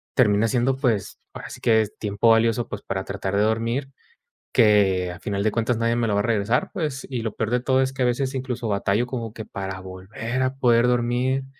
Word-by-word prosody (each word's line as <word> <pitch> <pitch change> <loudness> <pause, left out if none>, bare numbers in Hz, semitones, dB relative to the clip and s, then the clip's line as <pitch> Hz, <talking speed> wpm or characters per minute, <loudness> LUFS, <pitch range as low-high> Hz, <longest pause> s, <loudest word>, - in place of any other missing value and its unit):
termina 105 -3 +4
siendo, 125 +3 +1
pues, 115 -7 -1
ahora - - -8
sí - - -10
que 110 -1 +4
es 105 - -5
tiempo 105 +2 +1
valioso, 115 +1 +2
pues, - - -6
para 95 0 -3
tratar 100 0 -3
de 100 - +3
dormir, 115 +5 -1 0.6
que 100 -6 +4
al 85 - -9
final 100 -1 -2
de 110 - +3
cuentas 115 +1 0
nadie 115 0 +1
me 120 - +1
lo 105 - 0
va - - +2
a - - -2
regresar, 115 +1 +1
pues. 150 -5 -3
Y 125 -3 -3
lo 110 -2 -3
peor 110 -1 -2
de 125 - +2
todo 130 +1 +2
es 130 - 0
que 130 -1 -1
a - - +3
veces 130 +2 0
incluso, 125 -2 -3
batallo 100 +3 0
como 115 -4 -5
que 110 - -7
para 95 -1 -6
volver 105 +7 -4
a 130 +1 -1
poder 120 -2 +4
dormir. 125 +2 0
115 Hz, 230 wpm, -23 LUFS, 105-125 Hz, 0.6 s, termina